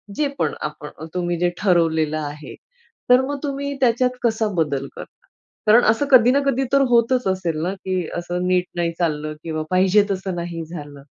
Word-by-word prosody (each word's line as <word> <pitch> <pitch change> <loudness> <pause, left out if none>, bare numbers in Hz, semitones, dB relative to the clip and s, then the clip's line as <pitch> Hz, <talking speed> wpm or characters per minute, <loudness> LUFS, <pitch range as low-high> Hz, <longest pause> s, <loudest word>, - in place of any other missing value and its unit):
जे 295 - +1
पण - - 0 0.2
आपण, 150 +1 -11
तुम्ही 175 -1 -1
जे 175 0 +2
ठरवलेलं 160 -5 +2
आहे, 150 0 -7 0.5
तर 250 +1 +7
मग 285 +1 -3
तुम्ही 280 0 -3
त्याच्यात 250 0 +2
कसा 225 -2 +1
बदल 140 -3 -2
करता? - - -12 0.4
कारण 230 +3 +6
असं 225 +6 -1
कधी 245 -2 +7
ना 275 - +3
कधी 270 -1 +1
तर 275 - +5
होतच 240 0 +2
असेल 175 -5 -1
ना 180 +3 -1
की, 185 -3 -3
असं 175 +1 -3
नीट 180 -1 +2
नाही 170 -1 0
चाललं 155 -3 -1
किंवा 155 -1 -3
पाहिजे 190 +3 +4
तसं 190 -1 -3
नाही 170 -1 -5
झालं. 145 -4 -9
180 Hz, 175 wpm, -21 LUFS, 160-235 Hz, 0.5 s, तर